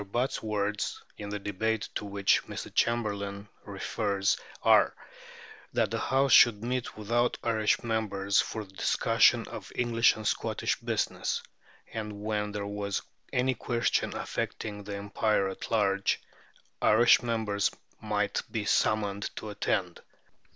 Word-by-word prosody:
Butt's 125 +4 0
words, 105 -1 -2
in 105 -1 -7
the 105 - -3
debate 105 +2 -1
to - - -3
which 100 -1 +2
Mr. - - -7
Chamberlain 100 -3 0 0.2
refers, 100 0 0 0.3
are, - - +5 0.8
"that - - +1
the - - -1
House 135 0 +2
should 115 -3 +7
meet 125 -1 -3
without 120 +3 +1
Irish 110 -1 +1
members 100 -4 +1
for 110 - -5
the 95 - -20
discussion - - +3
of - - -8
English 120 -1 +3
and 110 - -8
Scotch - - -1
business; - - -1 0.5
and 110 -1 -4
when 105 0 -2
there 105 -1 -4
was 100 -1 -3 0.3
any 130 +1 +2
question 115 0 0
affecting 105 -2 -4
the 100 0 -5
Empire 100 0 0
at 95 - -7
large, 100 -3 +2 0.6
Irish 120 +3 +6
members 110 -4 0 0.3
might - - 0
be - - -3
summoned 100 -2 +1
to 105 - -6
attend. 95 -3 -1
105 Hz, 130 wpm, -29 LUFS, 100-115 Hz, 0.8 s, should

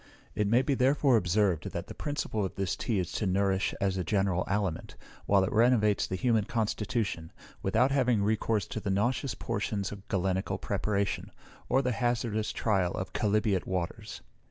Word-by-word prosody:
It 105 -1 0
may 120 +5 +4
be 140 - +1
therefore 135 0 +3
observed, 95 -3 +1
that 85 +1 -4
the - - -9
principle 145 -8 -2
of 95 - -4
this 95 -3 -1
tea 115 - -1
is 90 -2 -2
to 105 - -1
nourish 95 +1 +1
as 95 -1 0
a 90 - -1
general 95 -1 +1
aliment, 100 -4 -2 0.3
while 100 -1 +4
it 95 - -1
renovates 110 -3 +3
the 95 - -3
human 110 0 +2
constitution, 110 -6 -2 0.3
without 115 +7 +2
having 125 -6 +2
recourse 110 0 +1
to - - -3
the 100 - -4
nauseous 120 +6 0
portions 100 -1 -2
of 100 -1 -10
galenical 95 0 -1
preparation, 100 -2 -1 0.4
or 135 - +3
the 125 - +1
hazardous 120 -3 -1
trial 95 -5 0
of 95 - -5
chalybeate 105 -3 +1
waters. 90 -2 -4
105 Hz, 170 wpm, -29 LUFS, 95-115 Hz, 0.4 s, may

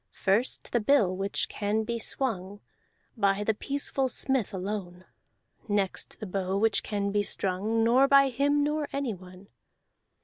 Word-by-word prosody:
First 205 +6 0
the 240 - +2
bill 210 -5 +3
which 195 +1 -2
can 210 +1 -1
be 235 +1 -3
swung 205 -5 -3 0.6
By 200 -2 +1
the 220 - +1
peaceful 270 +3 -1
smith 260 -5 +1
alone; 185 -2 -5 0.6
Next 205 -3 -1
the 215 - -5
bow 190 0 -2
which 220 +2 +2
can 200 -1 -2
be 205 0 +2
strung 205 +3 -1
Nor 250 +4 +5
by 275 0 +6
him 285 +3 +1
nor 300 0 -1
anyone. 195 -7 -6
210 Hz, 140 wpm, -28 LUFS, 195-260 Hz, 0.6 s, by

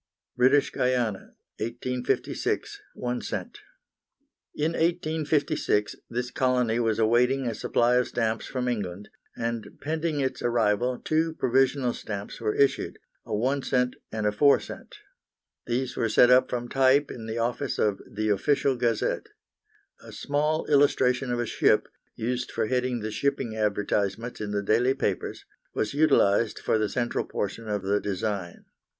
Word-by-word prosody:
British 130 +3 +4
Guiana, 125 -6 -1 0.2
1856, 125 +3 -2
1 125 0 -3
c. - - -3 1.2
In 155 +2 0
1856 155 -10 0
this 120 +1 -3
colony 125 -3 +1
was 115 -2 +1
awaiting 125 +4 +3
a 115 - -1
supply 120 +3 +2
of 125 - +2
stamps 115 -2 -1
from 125 -1 -3
England, 100 -4 -3 0.3
and 115 -1 -4
pending 155 0 -2
its 130 -1 -1
arrival 120 +1 +1
two 160 +3 0
provisional 130 -1 +2
stamps 100 0 -6
were 105 -2 0
issued, 140 -1 +1 0.3
a - - -2
1 130 +6 0
c. 125 -1 +1 0.2
and 110 -1 -2
a 105 - +3
4 140 +7 +5
c. - - -7 0.9
These 125 +1 -1
were 115 -2 0
set 120 +3 +6
up 125 +1 +5
from 120 -1 -3
type 135 +2 +3
in 115 -2 -8
the 110 +1 -4
office 120 +4 -1
of 105 -2 +1
the 110 +1 -1
Official 135 +6 +2
Gazette. 120 -3 0 0.7
A - - -12
small 150 +2 -1
illustration 130 -3 +3
of 120 - -1
a 120 - 0
ship, - - +2 0.3
used 125 +2 -2
for - - -1
heading 125 0 -1
the 110 +1 -4
shipping 135 -2 -1
advertisements 105 +1 -1
in 105 - -3
the 105 0 -1
daily 120 +6 +2
papers, 105 -8 -3 0.3
was 105 - -1
utilised 115 -8 +3
for 110 - 0
the 105 -1 0
central 120 -2 -1
portion 110 +3 -4
of 105 -2 -2
the 100 +2 +1
design. 100 -2 -3
120 Hz, 145 wpm, -26 LUFS, 110-130 Hz, 1.2 s, set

